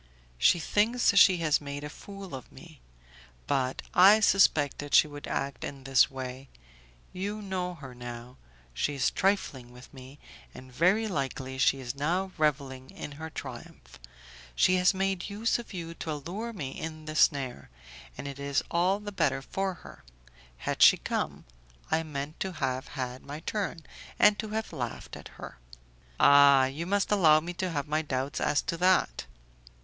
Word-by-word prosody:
"She - - +5
thinks 215 +6 +2
she 190 -1 +7
has 155 -1 +2
made 145 0 -6
a - - -4
fool 195 +2 -10
of 130 -2 -8
me; - - -14 0.7
but 130 - -1
I 195 +4 +7
suspected 145 -8 +3
she - - +7
would 145 -1 -9
act 135 -3 -3
in 135 -1 -7
this 135 -1 +4
way. 130 0 -7 0.6
You 200 +3 -4
know 185 -3 -4
her 135 -5 -10
now. 120 +1 -9 0.4
She 145 - -1
is 135 - +1
trifling 145 -11 -1
with 125 +3 -15
me, 130 +1 -12 0.4
and 130 0 -12
very 190 - +2
likely 135 -6 -4
she 135 0 +3
is 125 -1 -5
now 175 +7 -1
revelling 135 -4 -1
in - - -8
her 160 +3 -7
triumph. - - -10 0.6
She 185 - +4
has 180 0 +4
made 195 -1 -1
use 215 +4 0
of 235 - -9
you 170 -4 -6
to 160 -1 -5
allure 185 +11 -5
me 150 -12 -6
in 155 +1 -7
the 155 0 -6
snare, 135 -5 +1 0.5
and - - -6
it 140 0 -7
is 140 0 -1
all 180 +4 +2
the 210 0 -7
better 135 -8 0
for 190 +4 -3
her; - - -13 0.5
had - - -4
she - - +8
come, - - -3 0.5
I 160 +1 +2
meant 150 -1 -6
to 190 -1 -3
have 130 -3 -2
had 125 0 -4
my 145 +2 -8
turn, 190 -6 -3 0.3
and 210 0 +5
to 220 - -3
have 220 +1 -4
laughed 120 -3 -5
at - - -10
her." - - -10 0.6
"Ah! 140 -1 +7
you 145 +6 -4
must 200 +1 0
allow 160 -7 +6
me 170 +3 -6
to 185 +1 -3
have 145 -4 -3
my 155 +1 0
doubts 135 -2 -3
as 145 -1 +1
to 170 - -3
that." 175 - +2
150 Hz, 170 wpm, -28 LUFS, 135-185 Hz, 0.7 s, she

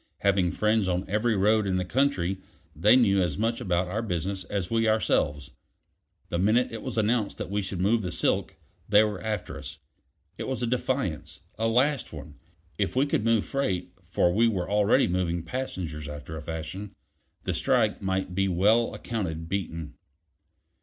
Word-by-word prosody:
Having 95 -3 +2
friends 110 -2 +2
on 90 +1 -1
every 110 +3 +1
road 105 +1 +3
in 95 - 0
the 90 - -1
country, 95 -6 +1 0.4
they 105 +10 +5
knew 100 -6 +4
as 85 -5 -1
much 115 +1 0
about 90 0 0
our 105 +5 -2
business 95 -2 -2
as 95 +1 -3
we 115 -1 +2
ourselves. 75 -10 +1 0.8
The 85 - -1
minute 110 +6 +3
it 115 - -6
was 130 -3 -5
announced 110 -1 +1
that - - -5
we 105 0 0
should 95 -2 -5
move 110 +5 +2
the 90 -3 -4
silk, - - 0 0.3
they 105 0 +7
were 105 -3 -2
after 110 -1 -4
us. - - -8 0.6
It - - -3
was 130 -2 -2
a - - +2
defiance; 120 - -2
a 115 +1 0
last 130 +5 +2
one. 75 -1 -9 0.5
If 100 -1 0
we 135 +2 +3
could 140 - 0
move 115 -2 +2
freight 120 -11 -2
for 85 - +1
we 115 +4 +4
were 95 -6 -1
already 105 +1 +3
moving 85 -2 -1
passengers 85 - -4
after 75 +2 -7
a 80 - -6
fashion 80 +6 -6 0.5
the - - -1
strike 115 -6 +1
might 95 -1 -1
be 95 +1 +1
well 105 +6 +3
accounted 80 -8 -4
beaten. 85 -5 -4
100 Hz, 175 wpm, -27 LUFS, 90-115 Hz, 0.8 s, they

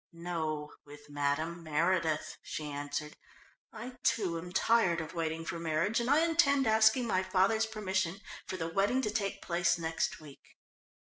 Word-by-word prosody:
"No, 160 -3 -4
with 145 0 -14
Madame 145 +4 -1
Meredith," 160 0 0
she 155 - -5
answered. 145 +1 -4 0.6
"I, 250 +1 -8
too, 180 -10 +1
am 175 +2 -8
tired 190 -3 +3
of 160 +1 -6
waiting 165 -1 -2
for 170 - -4
marriage 165 +7 0
and 235 +1 -1
I 290 +3 +5
intend 280 -5 +3
asking 220 +2 +4
my 185 -5 +1
father's 190 +4 +2
permission 190 -4 -2 0.3
for 185 - -4
the 165 -2 -2
wedding 205 +8 +2
to 210 - 0
take 205 -3 -2
place 170 -1 +1
next 165 -1 -2
week. 150 -3 -15
175 Hz, 155 wpm, -32 LUFS, 160-215 Hz, 0.6 s, I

